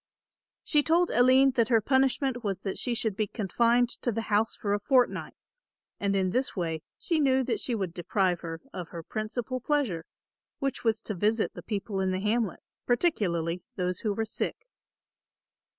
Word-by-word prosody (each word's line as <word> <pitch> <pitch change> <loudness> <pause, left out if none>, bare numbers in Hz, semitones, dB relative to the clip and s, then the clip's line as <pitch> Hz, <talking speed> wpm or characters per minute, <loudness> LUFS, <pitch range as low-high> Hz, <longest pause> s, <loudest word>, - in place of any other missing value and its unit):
She 295 - +3
told 335 +4 +2
Aline 260 +2 +5
that 235 -3 +2
her 230 -2 +4
punishment 265 +1 +1
was 195 -3 -2
that 195 - -3
she 245 - -1
should 220 -3 -1
be 215 +1 0
confined 235 +4 +2
to 240 - 0
the 225 +1 -2
house 215 +2 +2
for 200 -1 -1
a 205 - +1
fortnight 250 +3 +1 0.6
and 200 0 0
in 190 -1 +1
this 255 +5 0
way 165 -4 -2 0.2
she 330 -2 0
knew 265 -2 +3
that 250 - -1
she 245 - -1
would 190 -6 -3
deprive 180 0 0
her 165 -1 -6
of 180 -3 -6
her 165 -1 -7
principal 230 +6 -3
pleasure, 245 - 0 0.5
which 275 -2 -2
was 225 -1 +1
to 215 - -4
visit 210 +4 +1
the - - -8
people 205 -2 -3
in 190 0 +1
the 185 0 -1
hamlet, 215 0 0 0.3
particularly 180 - +1
those 180 -2 -1
who 215 - -1
were 220 +2 -1
sick. 220 - -4
220 Hz, 180 wpm, -28 LUFS, 190-250 Hz, 0.6 s, Aline